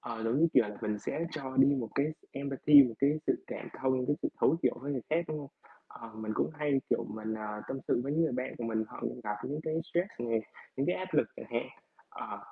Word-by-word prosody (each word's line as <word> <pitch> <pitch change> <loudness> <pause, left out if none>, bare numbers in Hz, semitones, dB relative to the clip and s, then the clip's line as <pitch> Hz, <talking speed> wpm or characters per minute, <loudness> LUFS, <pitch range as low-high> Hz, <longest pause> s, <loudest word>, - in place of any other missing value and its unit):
Ờ, 115 -1 -5
giống 115 +4 +2
như 165 - +6
kiểu - - +6
là 105 - -7
mình 105 -2 -1
sẽ 165 +10 -2
cho 135 -5 -5
đi 135 - +8
một 115 - -3
cái 140 - +3 0.3
empathy, 140 +1 +6
một 120 -3 -3
cái 140 - +4 0.2
sự - - +1
cảm - - -6
thông, 130 -1 +1
cái 145 - +2
sự - - +1
thấu - - +5
hiểu - - +3
với 145 +1 -2
người 130 - -2
khác, 165 +2 +2
đúng 155 -1 -2
hông? 140 -2 -8 0.4
Ờ, 115 - -10
mình 110 0 -4
cũng - - +1
hay, 145 -3 +1
kiểu, - - +2
mình, 110 +1 -4
ờ, 105 -1 -4
tâm 135 - -2
sự - - +3
với 140 - -1
những 160 +2 +3
người 160 - +1
bạn 125 +1 -2
của 120 - -3
mình, 110 -1 0
họ - - -10 0.2
gặp 105 -1 -1
những 145 +3 -3
cái 155 0 -2 0.2
stress 175 -4 -1
này, 115 -1 +3 0.4
những 135 - +1
cái 180 - +2
áp 185 0 -4
lực - - +4
chẳng - - -8
hạn, - - -1 0.4
ờ, 425 0 -6
135 Hz, 260 wpm, -32 LUFS, 115-150 Hz, 0.4 s, đi